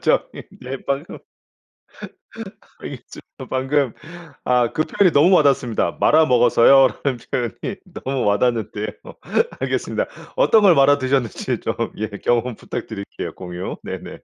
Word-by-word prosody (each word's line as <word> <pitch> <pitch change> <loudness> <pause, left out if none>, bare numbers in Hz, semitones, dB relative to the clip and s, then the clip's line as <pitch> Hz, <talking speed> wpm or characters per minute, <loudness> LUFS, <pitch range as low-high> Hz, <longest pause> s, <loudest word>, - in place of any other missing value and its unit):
저기 - - 0 0.2
네 130 +2 -5
방금 140 +4 -3 1.7
여기 - - -7 0.4
저 - - -8
방금 135 -1 0 0.5
아 125 -2 +2
그 155 - +1
표현이 185 +2 +2
너무 165 +7 +5
와닿습니다. 135 -7 +1
"말아 160 +1 +5
먹었어요." 125 +1 +5 0.2
라는 135 -4 -1
표현이 125 - -3 0.3
너무 135 -1 -1
와닿는데요. 105 0 0 0.7
알겠습니다. - - -2 0.3
어떤 230 - +5
걸 185 -4 +6
말아 140 0 +5
드셨는지 130 -4 -1
좀 - - -3 0.2
예 110 - -2 0.2
경험 120 0 +1
부탁드릴게요. 100 -1 -7
공유 90 0 -6
네네. - - -7
130 Hz, 285 characters per minute, -20 LUFS, 115-145 Hz, 1.7 s, 걸